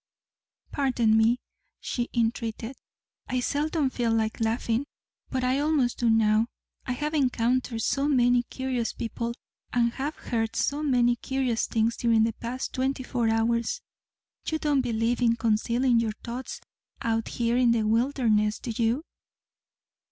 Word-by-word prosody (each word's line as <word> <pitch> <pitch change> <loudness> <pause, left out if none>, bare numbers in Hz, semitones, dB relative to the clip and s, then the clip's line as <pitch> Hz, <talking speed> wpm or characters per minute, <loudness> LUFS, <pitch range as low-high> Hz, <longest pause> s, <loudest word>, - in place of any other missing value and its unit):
"Pardon 250 -6 +2
me," 225 +2 +4 0.4
she 240 -1 -3
entreated. 230 +1 -2 0.5
"I 255 - 0
seldom 290 +2 0
feel 235 -3 0
like 220 -1 0
laughing, 230 +3 0 0.4
but 260 -1 -2
I 255 +2 +2
almost 290 -5 +1
do 235 - +2
now. 220 0 +3 0.4
I 250 - 0
have 300 +4 -3
encountered 250 -4 +1
so 275 +1 +1
many 245 -3 +4
curious 250 -1 -3
people 235 +1 -4 0.4
and 235 -1 +2
have 285 +3 -3
heard 225 -2 -2
so 285 +1 0
many 245 -4 +3
curious 260 -3 -1
things 225 +1 +1
during 230 -2 +3
the 225 0 +1
past 245 +4 -5
twenty 260 0 -1
four 240 -3 0
hours. 235 - +1 0.7
You 315 - 0
don't 295 -3 +1
believe 235 0 0
in 230 -1 +4
concealing 235 +2 +2
your 225 -2 0
thoughts 245 +2 -5 0.4
out 225 -1 0
here 235 0 0
in 250 -1 +4
the 235 -1 +3
wilderness, 220 -2 +2
do 240 - -5
you?" 235 +7 +1
240 Hz, 145 wpm, -27 LUFS, 225-260 Hz, 0.7 s, me